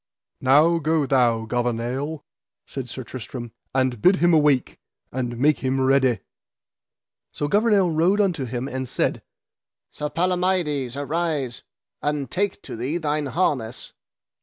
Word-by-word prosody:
Now 150 +6 +4
go 155 -1 +1
thou, 120 -4 +2
Gouvernail, 120 +6 -2 0.4
said 130 -3 -6
Sir 130 - -6
Tristram, 120 0 -7 0.2
and 130 -4 +1
bid 185 +2 +6
him 175 -1 +3
awake, 150 -5 +3 0.3
and 120 -2 -3
make 145 +4 +3
him 130 0 0
ready. 130 -5 +3 1.1
So 145 - -2
Gouvernail 205 0 +3
rode 170 +6 +2
unto 180 -9 +1
him 125 +2 -4
and 130 -2 -4
said: - - 0 0.7
Sir 150 0 -4
Palamides, 175 -7 0
arise, 145 -4 -2 0.4
and 145 -4 -2
take 200 +2 -1
to - - -7
thee 130 +8 -2
thine 150 -2 -1
harness. 130 -7 -1
140 Hz, 130 wpm, -23 LUFS, 125-165 Hz, 1.1 s, bid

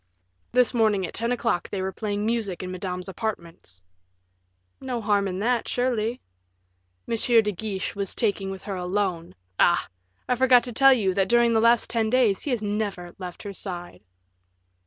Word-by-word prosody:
"This 250 0 +4
morning 215 -5 +2
at - - -8
ten 230 +2 -1
o'clock 235 -6 -1
they 200 - -3
were 190 0 -2
playing 205 +1 -3
music 220 -6 -2
in 185 - -5
Madame's 180 0 -5
apartments." 170 - -6 1.0
"No 255 -2 -3
harm 205 -2 +1
in 185 -1 -4
that, 240 +1 +1
surely." 245 -1 -1 0.9
"M. 230 - 0
de 225 -2 +3
Guiche 195 0 -4
was 200 -2 -4
talking 200 -4 0
with 190 0 -7
her 200 - -5
alone 180 -2 -2 0.2
Ah! - - +4 0.4
I 250 - +2
forgot 250 -1 +5
to 245 - -6
tell 270 +3 +6
you, 200 -7 +1
that, 195 0 +1
during 235 -1 +4
the 220 - +3
last 235 0 +4
ten 225 -2 0
days, 230 -5 +2
he - - -4
has 240 -4 -1
never 205 -4 -3
left 180 -2 -7
her 200 - -6
side." 175 -3 -7
210 Hz, 175 wpm, -25 LUFS, 190-235 Hz, 1.0 s, tell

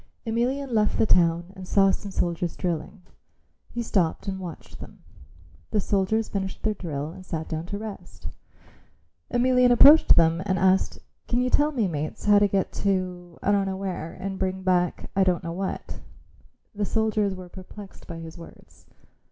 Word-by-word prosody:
Emelian 250 +4 -1
left 210 -2 +2
the - - +3
town 170 -1 +2
and 185 -1 -9
saw 195 0 +4
some 200 - -4
soldiers 175 -2 -1
drilling. 180 +1 -4 0.7
He 240 - -4
stopped 185 -5 0
and 190 -1 -3
watched 175 -4 -9
them. - - -12 0.7
The 215 - +1
soldiers 205 +3 0
finished 190 -1 -4
their 215 - +1
drill 155 -6 -5
and 185 +2 -11
sat 160 -3 -5
down 160 +1 -4
to 200 - -4
rest. 195 - -8 1.0
Emelian 250 0 +4
approached 290 +6 +8
them 165 +1 +3
and 190 -1 +1
asked, 190 +1 +2 0.3
"Can 240 - +1
you 250 0 0
tell 295 +1 +3
me, 235 -8 0
mates, 155 -2 -4
how 205 -1 +6
to 205 - +4
get 195 -1 0
to 180 -3 -2
I 205 - +2
don't 200 -1 +2
know 190 0 -3
where 185 -4 -4
and 190 0 -5
bring 190 0 -2
back 180 -2 0
I 195 - +4
don't 180 -1 +1
know 165 -1 -4
what." 190 +2 -5 0.7
The 210 0 -3
soldiers 215 -2 0
were 185 -1 -9
perplexed 190 +3 -12
at 165 -1 -6
his 165 +1 -10
words. 165 - -15
190 Hz, 175 wpm, -25 LUFS, 175-210 Hz, 1.0 s, approached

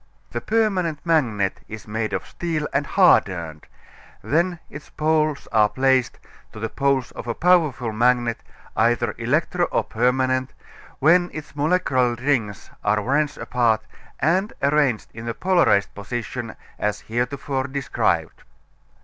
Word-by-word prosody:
The 120 - -3
permanent 195 -8 0
magnet 115 - +1
is 110 0 -9
made 110 +1 -2
of - - -3
steel 160 -3 -3
and 140 0 0
hardened; 85 - +2 0.6
then 170 - +1
its 150 +1 -11
poles 155 -2 0
are 105 -2 +4
placed, 130 -1 +1 0.4
to 110 - -9
the 115 +1 -3
poles 135 0 0
of - - -9
a 115 - -2
powerful 155 -10 +2
magnet, 120 +1 +1 0.3
either 120 +2 +2
electro 155 +8 +1
or - - 0
permanent, 130 +2 0 0.4
when 175 +5 +4
its 155 -2 -9
molecular 145 -6 +1
rings 120 -6 -2
are 105 +1 +2
wrenched 145 +6 0
apart 115 -3 +1 0.4
and 185 +9 +1
arranged 140 -5 +2
in 115 +1 -8
a 115 - -3
polarized 175 - +2
position 120 +2 -5 0.2
as 105 0 -1
heretofore 130 +3 -2
described. 135 0 -1
130 Hz, 130 wpm, -22 LUFS, 115-155 Hz, 0.6 s, are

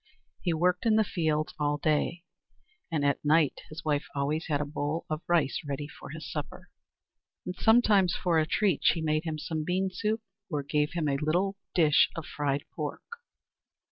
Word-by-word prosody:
] - - -44
He 175 - 0
worked 180 +5 +1
in 220 - +5
the 220 - +5
fields 155 -6 -1
all 145 0 +1
day, 155 +3 0 0.7
and 150 -3 0
at 140 - +1
night 150 0 +3
his 155 +1 -9
wife 145 -1 0
always 145 +3 -1
had 145 -3 +1
a 150 - -1
bowl 145 +2 -3
of 155 +1 -1
rice 165 -6 +2
ready 145 0 -4
for - - -11
his 160 +1 -7
supper. 150 -4 -6 0.7
And 180 - -4
sometimes, 210 -6 +4
for 170 -3 +2
a 155 - +1
treat, 195 -5 +2
she - - +4
made 155 0 0
him 160 -1 -2
some 155 0 -3
bean 185 +3 0
soup, 215 +4 -1 0.3
or 150 -4 -2
gave 150 +2 0
him 165 -3 -1
a 140 -1 +1
little 180 +6 +1 0.2
dish 155 -4 +5
of 165 -2 -5
fried 145 -1 -1
pork. - - -5
155 Hz, 185 wpm, -29 LUFS, 150-180 Hz, 0.7 s, in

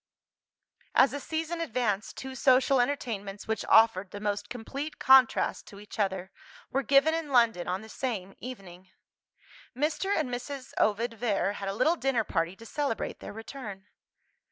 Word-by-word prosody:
As 265 - +6
the 285 - -4
season 320 +4 -3
advanced, 225 -8 -1
two 265 0 -6
social 260 0 +4
entertainments 215 -7 -3
which 220 0 -1
offered 220 -4 +5
the 205 - -7
most 205 0 -2
complete 275 +6 -6
contrast 265 -2 +4
to 200 - -11
each 210 +1 -11
other, 190 -2 -1 0.4
were 270 - +1
given 275 +5 +4
in 325 -2 -2
London 235 -8 +3
on 185 +2 -2
the - - -11
same 215 -6 -4
evening. 190 -7 -10 0.9
Mr. 305 +7 0
and 310 - 0
Mrs. 260 +2 -6
Ovid 230 +3 +1
Vere 210 -3 0
had 195 -1 -4
a 195 - -3
little 310 +10 +2
dinner 255 -5 +1
party 165 -2 -1
to 230 - -13
celebrate 275 -2 -3
their - - -8
return. 220 -2 -8
235 Hz, 155 wpm, -29 LUFS, 205-270 Hz, 0.9 s, As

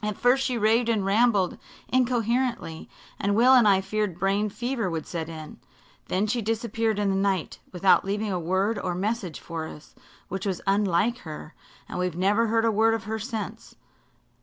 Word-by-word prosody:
At 210 -1 -2
first 255 +2 +3
she 255 -3 -1
raved 225 +2 +2
and 215 -4 +1
rambled 205 -2 +2 0.3
incoherently, 245 -7 0 0.3
and 200 +1 +1
Will 250 +4 +6
and 245 -4 +6
I 195 -2 +5
feared 195 -2 -2
brain 195 +3 +1
fever 240 -1 -2
would 165 -2 -4
set 165 -2 -5
in. 155 -2 -9 0.5
Then 190 +3 0
she 230 +3 -1
disappeared 225 0 -1
in 205 -1 +1
the - - 0
night, 195 -3 -1
without 185 +1 +4
leaving 205 +2 -2
a 180 - -1
word 190 +5 0
or 180 -3 -2
message 195 -3 -2
for 165 -2 -5
us, 150 - -12 0.3
which 195 +2 -4
was 185 -3 -1
unlike 200 +3 +2
her 155 -4 -9 0.3
and - - -5
we've 180 -2 -2
never 205 +5 +2
heard 225 +1 +2
a 225 - +3
word 225 +2 +3
of 225 - -5
her 220 +2 -3
since. 220 -1 -6
205 Hz, 185 wpm, -26 LUFS, 185-230 Hz, 0.5 s, Will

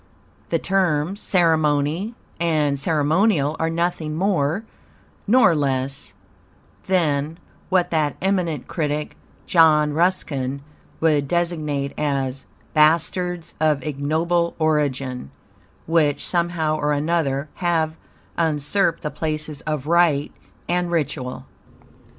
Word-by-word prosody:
The - - +2
terms 185 -1 0
"ceremony" 160 +3 +1 0.2
and 155 -4 +1
"ceremonial" 155 +1 +2
are 160 - +1
nothing 165 -2 -1
more 175 0 0 0.6
nor 245 -4 +5
less 135 -3 -2 0.7
than, 160 -4 +1 0.3
what 180 -1 +2
that 155 -3 +1
eminent 180 -7 -1
critic, 150 -2 -2 0.3
John 155 -3 +4
Ruskin, 140 -6 0 0.4
would 150 -3 +2
designate 155 -5 -1
as 135 -2 -2 0.3
"bastards 170 +2 +2
of 150 -3 +2
ignoble 160 +4 0
origin," 140 - -1 0.6
which, 155 -3 +1
somehow 170 -3 0
or 150 0 0
another, 145 -2 0
have 165 -3 0 0.4
usurped 165 +3 +1
the 150 - -2
places 155 0 -3
of 150 -3 -2
"rite" 160 -3 +3 0.4
and 175 0 0
"ritual." 135 -6 -2
155 Hz, 95 wpm, -22 LUFS, 145-170 Hz, 0.7 s, nor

